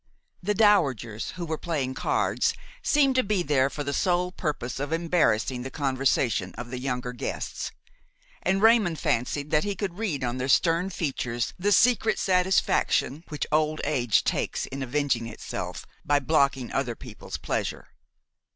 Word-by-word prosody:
The 205 +3 0
dowagers 140 - +2
who 180 -2 -5
were 160 -1 -3
playing 140 -6 -2
cards - - 0 0.3
seemed 280 -2 +3
to 255 0 +3
be 200 -3 0
there 140 -3 +2
for 145 +2 -5
the 140 0 -3
sole 180 +3 +1
purpose 150 -8 -3
of 145 +2 -3
embarrassing 150 -8 +1
the 130 - -5
conversation 130 -8 0
of 120 0 -7
the 125 - -4
younger 125 -1 -3
guests, 120 - -4 0.7
and 195 +2 +1
Raymon 220 -7 +5
fancied 140 +2 -1
that 150 - +3
he 205 -1 -2
could 190 -2 -4
read 170 -12 -2
on 120 +1 -2
their 130 +1 -2
stern 170 +5 +3
features 125 -9 -2
the 205 +3 +1
secret 225 +1 +4
satisfaction 180 -5 +2
which 150 -3 -3
old 155 0 +2
age 120 -5 +2
takes - - -1
in 135 +1 -6
avenging 130 -3 0
itself 115 - -6 0.2
by 145 - +3
blocking 140 -3 +1
other 125 -4 -1
people's 110 -3 -8
pleasure. - - -3
145 Hz, 155 wpm, -26 LUFS, 130-180 Hz, 0.7 s, Raymon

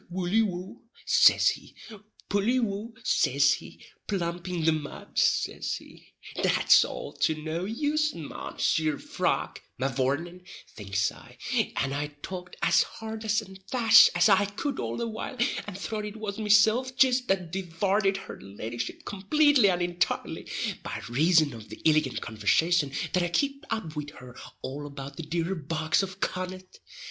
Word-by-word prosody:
"Woully 185 +4 +1
wou," 185 -3 -4 0.2
says - - +6
he, - - -11 0.5
"Pully 215 +6 +1
wou," 220 0 -3
says 140 - +3
he, - - -9 0.2
"Plump 175 -2 -3
in 170 -3 -2
the 160 - +5
mud," 155 -2 -4
says - - +1
he. - - -14 0.3
"That's - - +5
all - - -6
to 160 - +2
no 160 +3 -4
use, 300 +7 0
Mounseer 155 -1 -1
Frog, - - -2 0.2
mavourneen," 140 +7 -1 0.3
thinks 100 -1 -1
I; - - -16 0.4
and 135 0 -1
I 145 +1 -2 0.2
talked 180 -1 -7
as - - +5
hard 220 0 -5
and - - -8
as 220 +1 +1 0.3
fast 230 -3 +7
as 175 +2 +5
I 205 -1 +5
could 225 +8 -4
all - - -3
the 235 - -2
while, 225 +4 -6 0.3
and 200 -2 -6
throth 210 +1 -4
it 210 0 -7
was 215 -1 -5
mesilf 220 +5 +3
jist 255 -1 +3
that 185 -4 0
divarted 195 +2 0
her - - -9
leddyship 115 +4 -6
complately 260 +3 +3
and 175 -1 +1
intirely, 175 0 -2 0.3
by - - -5
rason 155 +2 +3
of 110 -2 -11
the - - -9
illigant 155 -4 +2
conversation 140 - +1 0.2
that 180 - +3
I 175 - +1
kipt 275 - -1
up 185 -9 -3
wid 150 -1 -4
her 125 -1 -12 0.3
all 145 +2 -5
about 140 -1 -9
the - - -4
dear 165 +3 -2
bogs 160 0 0
of 195 0 -6
Connaught. 185 0 -4
180 Hz, 155 wpm, -27 LUFS, 155-215 Hz, 0.5 s, fast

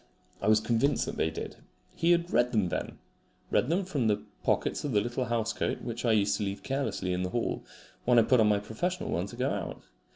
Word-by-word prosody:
I 100 - -1
was 110 0 +6
convinced 120 +6 +1
that - - -5
they 80 - +2
did. - - -6 0.4
He 165 - +1
had 175 0 +3
read 120 0 +3
them 105 -5 +2
then - - -3 0.5
read 125 - +2
them 180 +4 +1
from 140 -10 0
the 105 -1 +1 0.2
pockets - - 0
of 145 - -2
the 105 - +5
little 120 +4 -2
house 115 -1 0
coat - - -2
which 120 0 -4
I 115 - +4
used 100 -1 +2
to 105 - -2
leave 100 0 -4
carelessly 110 -9 -1
in 90 - -1
the 90 - -1
hall 120 +4 -2 0.4
when 125 0 +4
I 115 - +7
put 125 +2 +4
on 110 - +5
my 105 - +4
professional 145 - -3
one 90 +3 -1
to 110 - -9
go 130 +3 0
out. - - -4
115 Hz, 235 wpm, -29 LUFS, 105-130 Hz, 0.5 s, I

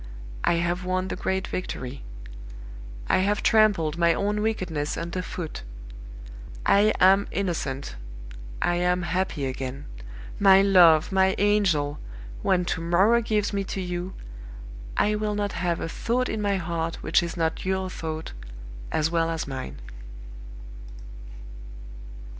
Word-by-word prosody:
"I - - +3
have 170 +1 -1
won 185 +1 -1
the - - -3
great 190 0 -2
victory; 135 -7 -5 1.1
I - - +3
have 200 +2 0
trampled 190 -8 +3
my 170 -1 +4
own 210 +1 -1
wickedness 180 -9 -2
under 170 +2 -3
foot. 175 -3 -6 1.0
I 205 +2 +5
am 195 +2 +5
innocent; 145 - -3 0.7
I 175 - +1
am 180 0 +1
happy 175 -4 -1
again. 130 +1 -5 0.5
My 195 -1 +7
love! 175 -5 +6
my 190 0 +3
angel! 185 -8 +1 0.4
when 180 -2 +2
to 165 - -2
morrow 190 +8 +3
gives 215 -2 0
me 200 -1 0
to 195 - -4
you, 180 0 -4 0.8
I 210 - +3
will 210 0 -1
not 205 -1 -1
have 175 -1 -1
a - - -3
thought 245 +8 -1
in 220 - -2
my 200 -1 +1
heart 165 -2 -3
which - - +3
is 170 +1 -5
not 160 -1 -1
your 190 0 -1
thought, 160 -3 -6 0.6
as 155 +1 0
well 165 -1 +1
as 165 -1 -2
mine!" 130 - -6
180 Hz, 135 wpm, -25 LUFS, 165-200 Hz, 1.1 s, My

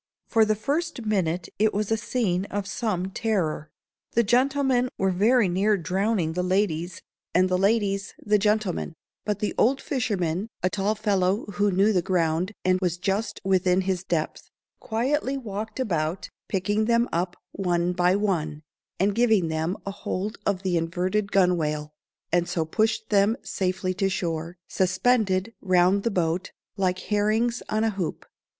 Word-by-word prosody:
For 225 -2 +4
the 215 0 +1
first 285 +3 -2
minute 180 -5 0
it 215 0 +2
was 210 +1 -1
a - - +4
scene 210 -5 -1
of 205 0 -3
some 195 -2 -2
terror. 185 -9 -1 0.4
The 235 - +4
gentlemen 255 +2 +2
were 190 0 +1
very 215 +4 +3
near 200 +4 +2
drowning 185 -1 0
the 180 - -1
ladies, 180 -2 -1 0.3
and 185 +1 +5
the 185 0 +1
ladies 200 -1 +1
the 210 0 +1
gentlemen; 210 -5 0 0.3
but 210 -2 0
the 210 - -1
old 265 +4 +3
fisherman, 200 - -1 0.2
a 185 - +2
tall 205 +2 0
fellow 200 -1 +1
who 205 +2 +1
knew 200 +3 +3
the 180 - +3
ground, 170 +1 0
and 185 0 +3
was 180 -2 0
just 200 +3 -2
within 185 -1 +2
his 185 -1 -1
depth, 165 -4 -3 0.3
quietly 265 +4 -1
walked 220 -1 -5
about, 170 -7 -1 0.2
picking 205 +3 0
them 235 +1 +3
up 175 +2 -1 0.2
one 175 -2 0
by 180 +1 +3
one, 160 -7 -1 0.4
and 200 +2 +2
giving 220 -6 +3
them 160 +4 -1
a 200 - -3
hold 200 +2 -4
of 195 -2 0
the 180 -2 +1
inverted 185 +5 -1
gunwale, 155 -5 +1 0.4
and 175 0 +2
so 165 -2 0
pushed 220 +5 0
them 205 +3 +3
safely 185 0 -1
to 195 +1 0
shore, 170 -1 -3
suspended 190 +1 +1
round 185 +1 +3
the 230 - 0
boat, 175 -2 -1 0.3
like 185 -2 0
herrings 220 +3 +1
on 215 +1 +1
a 225 - +2
hoop. 190 -5 -4
195 Hz, 155 wpm, -25 LUFS, 180-215 Hz, 0.4 s, and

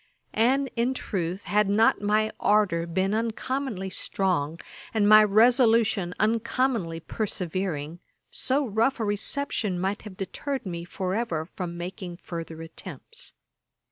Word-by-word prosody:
And, 265 +5 +3
in 245 +2 +1
truth, 185 -4 -3
had 210 -1 +2
not 215 +2 +4
my 215 +1 +2
ardour 195 -5 +2
been 190 +4 0
uncommonly 225 -2 -2
strong, 170 -6 -1 0.4
and 205 -2 +3
my 215 0 +9
resolution 220 -3 +4
uncommonly 225 -4 +1
persevering, 175 -5 -3 0.3
so 275 +2 +1
rough 230 +4 +1
a 220 - 0
reception 205 -2 -1
might 195 +3 -1
have 205 -4 -10
deterred 265 +8 -4
me 170 -2 -5
for 185 +1 -3
ever 185 -8 -1
from 175 0 -6
making 180 +1 -6
any 170 - -13
further 165 -1 -6
attempts. 460 - -9
205 Hz, 130 wpm, -26 LUFS, 175-230 Hz, 0.4 s, my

